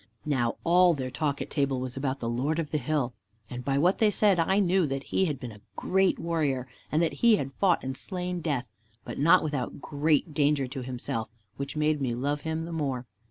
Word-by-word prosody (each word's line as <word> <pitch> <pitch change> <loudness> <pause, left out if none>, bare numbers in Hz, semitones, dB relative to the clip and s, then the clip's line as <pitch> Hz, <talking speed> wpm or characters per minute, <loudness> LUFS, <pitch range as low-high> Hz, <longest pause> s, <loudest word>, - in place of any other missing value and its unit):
Now 125 -6 +1
all 175 0 +5
their 130 -2 -4
talk 145 0 -1
at - - -13
table 140 -3 0
was 130 -1 -4
about 135 0 -2
the 115 - -3
Lord 130 +7 0
of 165 -3 -2
the 150 - +1
hill, 135 -2 -1 0.4
and, 125 0 -5
by 135 +1 0
what 175 +7 +3
they 220 - +5
said, 205 -3 +3
I 190 +4 +2
knew 190 -3 +3
that 135 0 -3
He 190 - +1
had 150 -6 -2
been 125 -4 -6
a 105 -1 -14
great 190 0 +2
Warrior, 145 -7 -1 0.2
and 155 +3 +3
that 165 - 0
He 235 -2 +7
had 135 -8 -3
fought 185 -3 +3
and 130 0 -3
slain 180 +2 -3
Death, 145 -6 -1 0.4
but - - -6
not 165 +6 +6
without 145 -5 -3
great 150 +1 +1
danger 145 -1 +2
to 130 +1 -6
Himself, 125 -3 -4 0.3
which 140 +2 -5
made 150 -1 +1
me 125 -3 0
love 145 +4 -1
Him 160 0 -3
the 170 - -7
more. 135 -6 -2
145 Hz, 220 wpm, -28 LUFS, 130-165 Hz, 0.4 s, He